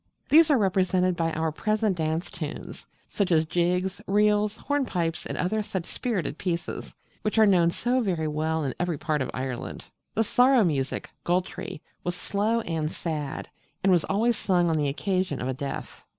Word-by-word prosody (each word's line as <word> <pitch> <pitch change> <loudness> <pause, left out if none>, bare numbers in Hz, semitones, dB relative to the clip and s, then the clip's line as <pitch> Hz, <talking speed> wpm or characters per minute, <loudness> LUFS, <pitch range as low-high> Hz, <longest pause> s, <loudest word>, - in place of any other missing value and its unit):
These 320 +2 +7
are 285 - +5
represented 185 -3 +2
by 165 -1 0
our 160 0 0
present 215 +4 0
dance 160 +1 -1
tunes, - - -7 0.2
such 200 -3 -1
as 160 -1 +4
jigs, 180 +3 0
reels, 210 +1 +3
hornpipes, 200 - -1
and - - -4
other 215 +4 0
such 190 -4 -4
spirited 185 - -3
pieces, 175 -2 -3 0.3
which 215 +1 -1
are 220 - +7
known 180 -4 +5
so 245 +8 0 0.3
well 155 +1 -1
in 135 -3 -1
every 175 -3 0
part 155 0 -1
of 130 - -2
Ireland. 130 -2 -5 0.3
The 225 - +3
'Sorrow 250 +2 +5
music' 140 -6 -1
(Goltree) 175 -3 -2 0.2
was 175 0 -2
slow 215 +5 0
and 160 -5 -2
sad, 150 -4 -4 0.4
and 195 - +4
was 175 -3 +4
always 225 +4 +1
sung 175 -3 +2
on - - +1
the 145 -2 +1
occasion 185 +1 -1
of 125 - -2
a 130 - 0
death. 140 +1 -6
180 Hz, 170 wpm, -26 LUFS, 160-210 Hz, 0.4 s, These